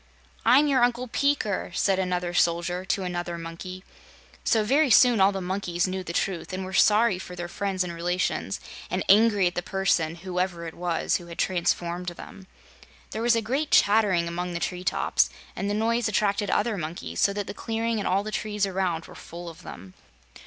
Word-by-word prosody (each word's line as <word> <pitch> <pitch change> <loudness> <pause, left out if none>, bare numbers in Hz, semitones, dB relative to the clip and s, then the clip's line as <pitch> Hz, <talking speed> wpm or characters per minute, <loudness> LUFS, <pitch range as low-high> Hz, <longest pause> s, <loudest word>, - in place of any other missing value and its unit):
"I'm 255 +6 +6
your 270 -4 +3
Uncle 245 +1 +1
Peeker," 235 -8 0
said 195 -1 +2
another 180 -1 -1
soldier 175 +1 +1
to 195 0 -1
another 175 -1 -3
monkey. 170 +3 -8 0.6
So, 220 -2 +2
very 275 +6 +3
soon 240 -2 +6
all 195 +1 +6
the 195 -1 -4
monkeys 180 -1 -1
knew 185 0 -3
the 175 - -5
truth 175 0 -2
and 185 0 -3
were 190 - -7
sorry 210 0 +4
for 180 -1 -8
their 175 0 -5
friends 190 +1 -2
and 175 -1 -5
relations 175 +2 -1 0.3
and - - -1
angry 205 -1 +5
at 175 - +1
the 175 - -2
person 180 -4 0
whoever 180 -1 -3
it 165 - -6
was 175 -1 0
who 175 - -12
had 170 0 -9
transformed 175 -1 -1
them. 185 +2 -9 0.6
There 220 - -4
was 240 0 +4
a 230 - 0
great 275 +7 -1
chattering 200 -5 +4
among 175 +1 -3
the 170 - -2
tree 180 +1 -3
tops, - - +2 0.3
and 200 - -2
the 205 - 0
noise 230 +2 +1
attracted 205 0 0
other 215 -2 0
monkeys, 155 - -5
so - - +4
that 205 0 -3
the - - -6
clearing 225 +1 -2
and 205 - -2
all 195 +2 +1
the 215 - -5
trees 210 -1 -1
around 185 -4 -2
were - - -13
full 170 +1 -9
of 165 - -13
them. 95 +1 -10
185 Hz, 195 wpm, -26 LUFS, 175-210 Hz, 0.6 s, I'm